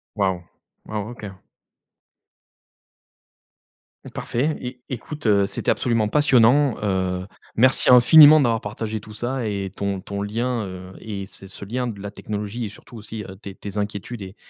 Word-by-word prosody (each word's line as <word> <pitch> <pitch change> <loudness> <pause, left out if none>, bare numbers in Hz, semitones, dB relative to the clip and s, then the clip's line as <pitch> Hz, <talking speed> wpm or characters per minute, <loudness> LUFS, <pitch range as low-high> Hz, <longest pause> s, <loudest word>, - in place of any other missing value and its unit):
Waouh. 95 -4 0 0.4
Wow, 110 0 -4
OK. 100 -5 -10 2.7
Parfait, 145 +6 -1 0.3
é - - -4
écoute, 145 +2 -5
heu, 100 -2 +4
c'était - - -1
absolument 115 -4 +1
passionnant, 135 -1 +4
heu, 95 -2 -1 0.3
merci 130 +4 +3
infiniment 150 +5 +9
d'avoir 115 -4 +2
partagé 110 +1 -4
tout 105 +2 -12
ça, 120 +2 -3
et 100 -2 -3
ton 100 -1 -3
ton 100 +1 -5
lien, 115 +2 -2
heu, 90 -1 -8
et 105 -3 -6
et - - -5
ce 95 0 -12
ce 100 - -10
lien 125 +5 -2
de 100 -4 -6
la 100 0 -6
technologie, 105 +3 -5
et - - -5
surtout 115 +3 -13
aussi, 110 0 -7
heu, 95 -1 -10
tes 100 -1 -10
tes 100 +1 -8
inquiétudes, 105 +2 -4
et 95 +1 -10
105 Hz, 155 wpm, -23 LUFS, 100-120 Hz, 2.7 s, infiniment